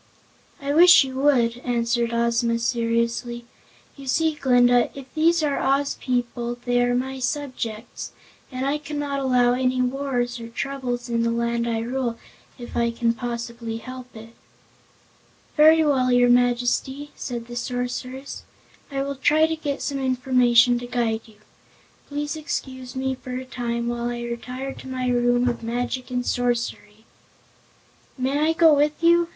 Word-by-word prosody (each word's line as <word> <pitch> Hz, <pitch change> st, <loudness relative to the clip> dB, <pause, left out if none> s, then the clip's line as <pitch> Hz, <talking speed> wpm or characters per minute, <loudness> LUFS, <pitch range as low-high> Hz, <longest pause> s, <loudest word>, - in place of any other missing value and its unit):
"I 280 Hz, 0 st, -2 dB
wish 350 Hz, +1 st, +8 dB
you 265 Hz, -1 st, -6 dB
would," 245 Hz, -4 st, +3 dB
answered 235 Hz, -1 st, 0 dB
Ozma 235 Hz, 0 st, +1 dB
seriously. 235 Hz, 0 st, -1 dB, 0.5 s
"You 275 Hz, -1 st, -11 dB
see, 320 Hz, +4 st, +2 dB
Glinda, 245 Hz, -4 st, +4 dB
if 275 Hz, -1 st, -8 dB
these 330 Hz, +1 st, +3 dB
are 285 Hz, -2 st, 0 dB
Oz 275 Hz, +1 st, +1 dB
people 240 Hz, -1 st, -2 dB
they 245 Hz, 0 st, +2 dB
are 245 Hz, 0 st, +2 dB
my 265 Hz, +1 st, -2 dB
subjects 250 Hz, -5 st, -4 dB, 0.4 s
and 255 Hz, 0 st, -3 dB
I 285 Hz, +2 st, 0 dB
cannot 290 Hz, -1 st, -3 dB
allow 250 Hz, -2 st, +3 dB
any 255 Hz, 0 st, 0 dB
wars 250 Hz, -1 st, -1 dB
or 230 Hz, -, -7 dB
troubles 245 Hz, 0 st, -4 dB
in 235 Hz, -1 st, 0 dB
the 230 Hz, -, +1 dB
Land 235 Hz, 0 st, -1 dB
I 225 Hz, -1 st, -1 dB
rule, 240 Hz, 0 st, -2 dB, 0.4 s
if 240 Hz, -2 st, -9 dB
I 235 Hz, 0 st, +2 dB
can 230 Hz, 0 st, 0 dB
possibly 235 Hz, -1 st, -5 dB
help 255 Hz, +1 st, -10 dB
it." 225 Hz, +1 st, -11 dB, 1.2 s
"Very 315 Hz, +1 st, +6 dB
well, 260 Hz, -4 st, +2 dB
your 245 Hz, 0 st, +5 dB
Majesty," 245 Hz, +4 st, +1 dB
said 240 Hz, -2 st, -5 dB
the 240 Hz, 0 st, -9 dB
Sorceress, 250 Hz, +2 st, -4 dB, 0.5 s
"I 275 Hz, -1 st, -2 dB
will 280 Hz, 0 st, -4 dB
try 310 Hz, +4 st, +4 dB
to 320 Hz, 0 st, -1 dB
get 290 Hz, -3 st, -4 dB
some 280 Hz, -1 st, -2 dB
information 250 Hz, -2 st, +3 dB
to 245 Hz, -, -7 dB
guide 230 Hz, -2 st, -1 dB
you. 220 Hz, -, -18 dB, 0.7 s
Please 295 Hz, +1 st, -3 dB
excuse 260 Hz, -4 st, -5 dB
me 265 Hz, 0 st, -1 dB
for 255 Hz, -1 st, -6 dB
a 260 Hz, -, -6 dB
time, 235 Hz, -2 st, -3 dB
while 240 Hz, 0 st, -2 dB
I 240 Hz, 0 st, -4 dB
retire 250 Hz, +3 st, -5 dB
to -, -, -11 dB
my 255 Hz, -1 st, -3 dB
Room 245 Hz, 0 st, +2 dB
of 240 Hz, -1 st, -1 dB
Magic 245 Hz, +2 st, -3 dB
and 250 Hz, -1 st, -2 dB
Sorcery." 235 Hz, -3 st, -2 dB, 1.1 s
"May 265 Hz, +3 st, 0 dB
I 315 Hz, +2 st, +2 dB
go 325 Hz, -1 st, +6 dB
with 295 Hz, +2 st, +1 dB
you?" 340 Hz, 0 st, +5 dB
250 Hz, 155 wpm, -23 LUFS, 235-275 Hz, 1.2 s, wish